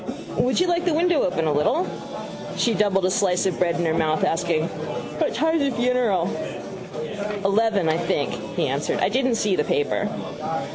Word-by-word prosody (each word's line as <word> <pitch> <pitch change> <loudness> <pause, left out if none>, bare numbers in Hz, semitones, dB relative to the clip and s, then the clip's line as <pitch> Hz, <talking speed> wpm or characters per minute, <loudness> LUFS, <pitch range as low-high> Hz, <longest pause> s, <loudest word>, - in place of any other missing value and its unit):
—Would 255 +4 +2
you 360 - +4
like 345 -1 +1
the 340 -4 +2
window 340 -1 +3
open 180 -3 0
a 155 - +2
little? 150 - +2 0.7
She 235 - +2
doubled 195 -2 +2
a 185 - +2
slice 185 -1 +2
of 185 -3 -1
bread 170 -2 +2
into 170 -2 0
her - - +1
mouth, 155 -1 +1
asking: 165 -1 +1
—What - - -4
time 320 0 +2
is 280 - +2
the 240 - -4
funeral? 240 -8 +2 1.2
—Eleven, 200 -2 +2
I 160 0 +2
think, - - 0 0.2
he - - +1
answered. - - -1
I - - +2
didn't 260 -2 +1
see 210 -4 +1
the 150 - +1
paper. 145 - 0
195 Hz, 185 wpm, -23 LUFS, 170-255 Hz, 1.2 s, you